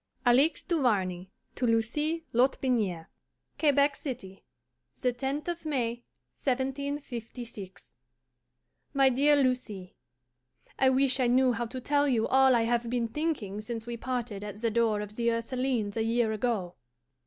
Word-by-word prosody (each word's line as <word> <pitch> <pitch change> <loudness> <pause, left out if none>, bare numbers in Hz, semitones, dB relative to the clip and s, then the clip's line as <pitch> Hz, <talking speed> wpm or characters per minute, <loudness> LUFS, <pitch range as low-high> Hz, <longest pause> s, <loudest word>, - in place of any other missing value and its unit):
ALIXE 265 +7 +4
DUVARNEY 195 - 0 0.2
TO 250 - -1
LUCIE 295 +9 0
LOTBINIERE. 235 -8 +1 0.5
QUEBEC 285 -1 +3
CITY, 195 -9 -7 0.6
the 250 -1 +1
10th 275 +5 -3
of 345 -1 -3
May, 240 -6 -1 0.4
1756. 255 -6 -4 1.0
MY 270 -1 +5
DEAR 285 +4 +4
LUCIE: 250 -9 -1 0.9
I 265 - +5
wish 265 0 +2
I 250 - +3
knew 255 +1 +4
how 235 0 -2
to 255 +3 -6
tell 290 +3 +1
you 235 -5 +2
all 265 -1 +5
I 230 - +3
have 235 0 0
been 235 -1 -1
thinking 230 -9 -2
since 225 +1 -6
we 240 0 -4
parted 235 -4 -4
at 210 0 -7
the 230 - +2
door 220 -2 +2
of 210 0 -8
the 235 0 +2
Ursulines 230 -2 -1
a 225 - 0
year 230 0 +1
ago. 215 -5 -1
245 Hz, 140 wpm, -29 LUFS, 225-270 Hz, 1.0 s, MY